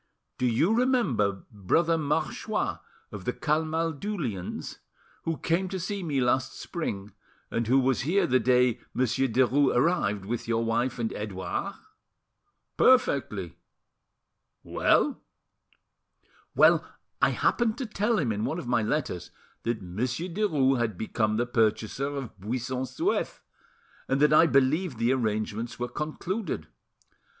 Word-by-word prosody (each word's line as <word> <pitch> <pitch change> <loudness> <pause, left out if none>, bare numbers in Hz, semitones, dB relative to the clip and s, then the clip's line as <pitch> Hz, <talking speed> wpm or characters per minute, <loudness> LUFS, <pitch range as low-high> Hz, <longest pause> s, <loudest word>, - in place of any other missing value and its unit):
"Do 125 - +2
you 140 - +2
remember 185 - +1
Brother 160 - +2
Marchois 150 -2 -1 0.3
of 105 -3 -7
the 125 - -1
Camaldulians, 160 - -2 0.5
who 165 -1 -1
came 180 +5 0
to 190 - -3
see 200 +3 -3
me 150 -6 -1
last 130 +1 0
spring, 105 - -4 0.4
and 115 -1 -1
who 130 +3 +5
was 130 -1 +2
here 175 +10 +2
the 130 +1 +3
day 125 -2 +3 0.2
Monsieur 130 +1 +1
Derues 130 +3 +3
arrived, 115 - +1
with 115 +3 -3
your 115 0 +1
wife 120 +2 0
and 115 -2 -2
Edouard?" 105 - -4 1.0
"Perfectly. 255 -1 +2 1.1
Well?" 290 - +2 1.3
"Well, - - +6 0.4
I - - +5
happened 235 -2 +1
to 260 - -3
tell 215 +1 0
him 135 - +1
in 105 0 -2
one 160 - -1
of 175 - -5
my 120 -2 +2
letters 105 - -2 0.3
that 115 -3 -2
Monsieur 120 - -3
Derues 150 - +2
had 110 -5 -1
become 110 0 0
the 120 - +1
purchaser 115 +3 0
of 135 -7 -6
Buisson 125 +5 -3
Souef, 330 - -1 0.7
and 135 +1 +1
that 150 +1 +5
I 165 +2 +7
believed 140 +2 +2
the 115 +2 +2
arrangements 110 -1 -2
were 125 - -2
concluded. 155 - -3
130 Hz, 130 wpm, -27 LUFS, 115-165 Hz, 1.3 s, I